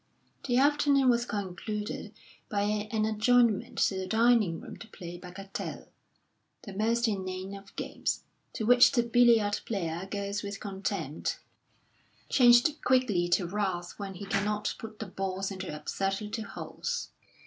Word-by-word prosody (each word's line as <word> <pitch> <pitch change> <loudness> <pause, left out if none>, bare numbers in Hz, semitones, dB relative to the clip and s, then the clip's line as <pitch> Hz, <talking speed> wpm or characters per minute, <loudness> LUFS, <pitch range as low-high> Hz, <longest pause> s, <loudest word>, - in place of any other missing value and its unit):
The 245 -1 +2
afternoon 280 -1 +4
was 240 0 0
concluded 210 +2 -4 0.4
by 205 -1 0 0.3
an 215 -2 +1
adjournment 220 0 +2
to 190 - +1
the 185 - -4
dining 220 -6 +3
room - - -10
to 230 - -11
play 175 -4 -9
bagatelle, 190 +2 -7 0.7
the 200 - -8
most 230 +4 +1
inane 190 -2 -3
of 195 0 -11
games, - - -2 0.3
to - - -3
which 245 +3 +7
the 240 -3 +3
billiard 235 -3 +4
player 175 -3 -3
goes 200 0 -3
with 200 -1 -5
contempt, 195 -1 -3 0.9
changed 245 +4 +5
quickly 225 -9 +2
to 180 +1 +2
wrath 180 -2 -2
when 195 -2 -5
he 200 - -7
cannot 210 +2 0
put 220 -1 -8
the 220 - -5
balls 195 0 -3
into 190 -1 -5
absurd 195 +6 -2
little 210 0 -5
holes. 480 - -4
205 Hz, 140 wpm, -29 LUFS, 190-235 Hz, 0.9 s, which